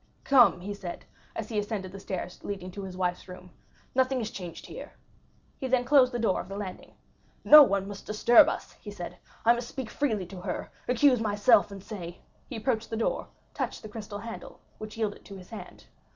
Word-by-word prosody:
"Come," 245 -9 +5
he 205 +3 -4
said, 190 -4 -7 0.3
as 215 - -4
he 215 -3 0
ascended 205 -3 -4
the 195 - -9
stairs 185 -1 -6
leading 190 -2 -5
to 200 - -7
his 190 -1 -7
wife's 180 0 -2
room, 180 -1 -11 0.4
"nothing 260 0 +2
is 220 -2 -3
changed 175 -3 -8
here." - - -9 0.7
He 265 - -2
then 250 -1 +2
closed 260 -1 +5
the 240 - -2
door 225 -5 +1
of - - -12
the 195 - -5
landing. 195 -3 -7 0.5
"No 300 0 +11
one 200 -7 +3
must 200 0 -9
disturb 220 +3 +6
us," - - -5
he 210 - -8
said; 180 -3 -7 0.3
"I 235 - +7
must 240 0 -4
speak 265 -4 -6
freely 220 -10 0
to 180 0 -9
her, 180 -1 -4 0.2
accuse 250 0 +4
myself, 210 0 +4
and 195 -1 -9
say"—he 190 +5 -9
approached 225 0 -1
the 225 - -3
door, 225 - -1 0.3
touched - - -4
the 215 - -8
crystal 210 -1 -7
handle, 225 +2 -8 0.2
which 215 0 -8
yielded 215 -2 -2
to 200 - -10
his 185 +2 -14
hand. 220 - -10
210 Hz, 200 wpm, -28 LUFS, 190-235 Hz, 0.7 s, No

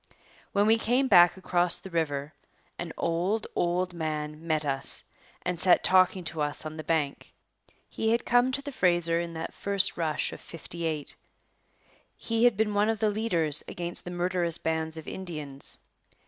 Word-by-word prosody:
When 205 0 +2
we 225 +1 +4
came 250 +4 +2
back 175 -4 +6
across 180 -1 +2
the 190 - -10
river 150 -3 -2 0.5
an 175 -2 -4
old, 180 +6 0
old 180 +1 0
man 155 -1 -4
met 155 -2 0
us 135 -1 -2 0.4
and 180 -2 -2
sat 180 +2 +4
talking 185 0 +4
to 160 -1 -4
us 145 +1 -2
on 155 0 -6
the 155 - -6
bank. 155 -3 -2 0.6
He 220 - -2
had 230 +1 +1
come 245 +2 +3
to 280 - -1
the 285 - -6
Fraser 175 -7 +1
in 170 -1 -6
that 160 0 -5
first 200 -1 +3
rush 160 -3 -1
of - - -10
'58. 165 -3 -5 1.0
He 230 +1 0
had 240 -5 +4
been 215 -1 +1
one 205 +1 +2
of 225 - 0
the 215 0 +1
leaders 170 -9 +1
against 175 0 +1
the - - -7
murderous 175 -1 +1
bands 160 0 -2
of 160 - -9
Indians. 150 -7 -5
175 Hz, 170 wpm, -28 LUFS, 160-200 Hz, 1.0 s, back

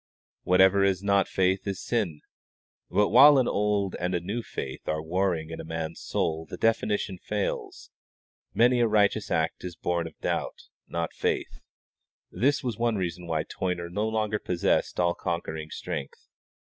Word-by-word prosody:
"Whatever 95 +2 +5
is 95 -1 +1
not 100 -1 +3
of - - -17
faith 95 +1 +1
is 100 -1 -2
sin"; 100 -11 -1 0.7
but 105 0 +2
while 140 +6 +8
an 130 - +3
old 100 -2 0
and 90 +1 -1
a - - +1
new 100 +8 -3
faith 65 - -7
are 80 - 0
warring 85 0 -1
in 80 - -5
a - - -9
man's 80 0 -5
soul 80 0 -2
the - - -6
definition 105 -4 0
fails: 105 +1 -4 0.6
many 120 +1 +4
a 120 - +4
righteous 105 -2 +2
act - - -1
is 90 -2 -6
born 85 -1 -1
of - - -13
doubt, - - -3 0.2
not 85 -1 -3
faith. - - -2 0.7
This 140 +3 +1
was 120 -4 -3
one 120 -1 +1
reason 90 -2 -3
why 80 -2 0
Toyner 85 -1 -3
no 105 +4 -1
longer 110 -1 -1
possessed 90 0 0
all 85 -1 +3
conquering 80 -3 -4
strength. 70 -3 -6
95 Hz, 165 wpm, -27 LUFS, 85-105 Hz, 0.7 s, while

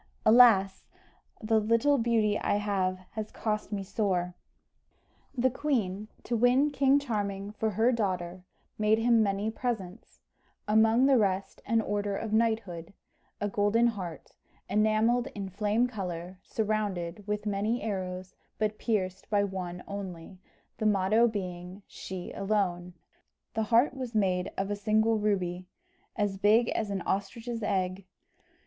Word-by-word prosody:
Alas! 215 -4 +6 0.6
the 220 0 +3
little 230 +6 +2
beauty 225 -3 +2
I - - 0
have 195 -3 0
has 215 0 -5
cost 210 -1 -3
me 200 -2 -2
sore!" 190 -3 -1 1.0
The 255 +1 +3
queen, 215 -8 -1 0.2
to 240 - -2
win 250 +5 +3
King 275 0 +4
Charming 205 -7 -3
for 220 +1 -1
her 220 +5 +2
daughter, 185 -6 -2 0.4
made 215 +1 +3
him 230 0 +4
many 205 +1 0
presents; 220 -5 -5 0.5
among 220 +4 +4
the 270 -3 +5
rest 195 -2 -1
an 225 0 +3
order 205 -1 -2
of 220 -1 -4
knighthood, 210 -6 -1 0.4
a 205 - -1
golden 205 +3 +2
heart, 190 -8 -4 0.4
enamelled 220 +4 +2
in 200 -2 -5
flame 210 +5 +1
colour, 185 -5 -6
surrounded 205 -4 -2
with 210 0 -2
many 210 +3 -1
arrows, 185 -3 -4 0.2
but 215 0 -1
pierced 190 -5 -2
by 205 -1 +2
one 180 -2 -5
only, 185 -2 -7 0.4
the 215 - +1
motto 210 +3 +3
being, 185 -2 -6
"She 185 -2 -7
alone." 185 -4 -1 0.6
The 220 - -1
heart 235 +5 +4
was 255 -4 -6
made 185 -3 +1
of 195 +1 -2
a - - 0
single 220 +2 +2
ruby, 185 -4 -1 0.5
as 200 -2 -1
big 220 +4 +4
as 215 -2 -2
an 195 -2 -3
ostrich's 230 +4 -3
egg. 185 -1 -1
210 Hz, 135 wpm, -29 LUFS, 190-225 Hz, 1.0 s, Alas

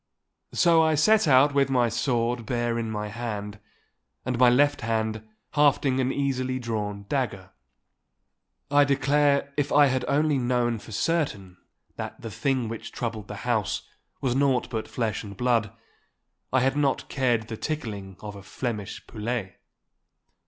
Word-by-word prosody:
So 170 -2 +5
I 160 -1 +3
set 215 +6 +4
out 140 +1 +5
with 140 -1 +3
my 125 -3 +3
sword 120 0 0
bare 120 -1 0
in 115 -1 -3
my 105 -1 -3
hand, 105 -2 -5 0.7
and 125 -1 -2
my 125 -1 +7
left 145 +4 +3
hand 110 -1 -1 0.3
hafting 145 -2 +3
an 130 0 +1
easily 130 -2 -1
drawn 105 -4 -4
dagger. 100 -9 -2 1.2
I 145 0 +6
declare 140 0 +2
if 145 -1 0
I 145 0 +6
had 130 -1 +1
only 150 0 +2
known 120 -2 0
for 110 - -12
certain 105 - -1 0.4
that - - -6
the 115 - -7
thing 130 +3 0
which 115 0 -6
troubled 110 -3 -4
the 105 - -6
house 115 -4 0 0.4
was 130 -2 +1
naught 135 -2 +1
but 110 -2 -3
flesh 115 -3 -2
and 100 -2 -9
blood, 115 -4 +1 0.8
I 130 - +3
had 135 +2 +2
not 145 -2 0
cared 120 -5 0
the 115 - -5
tickling 105 - -5
of 105 -1 -7
a 100 - -9
Flemish 105 0 -5
poulet. 110 -4 -4
120 Hz, 150 wpm, -26 LUFS, 110-140 Hz, 1.2 s, my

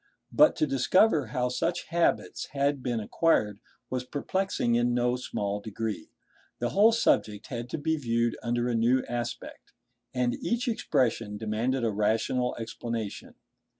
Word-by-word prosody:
But 300 - +5
to - - +2
discover 145 - +3
how 125 +2 -1
such 165 +7 -2
habits 170 0 0
had 140 0 +1
been 120 -3 -1
acquired 105 -3 +1 0.3
was 130 -1 -1
perplexing 145 -1 -1
in 120 +1 +2
no 125 0 +2
small 105 -5 -3
degree. 110 -3 -5 0.5
The 120 - -1
whole 210 - +5
subject 110 - +1
had 120 -1 -5
to - - -3
be 160 +2 0
viewed 115 -4 0
under 120 +1 0
a 120 - 0
new 120 +3 +2
aspect, 120 0 -5 0.4
and 125 -1 0
each 235 +2 -1
expression 115 - 0
demanded 115 +4 -1
a 115 - +1
rational 110 +4 0
explanation. 115 -2 -5
120 Hz, 145 wpm, -28 LUFS, 115-140 Hz, 0.5 s, But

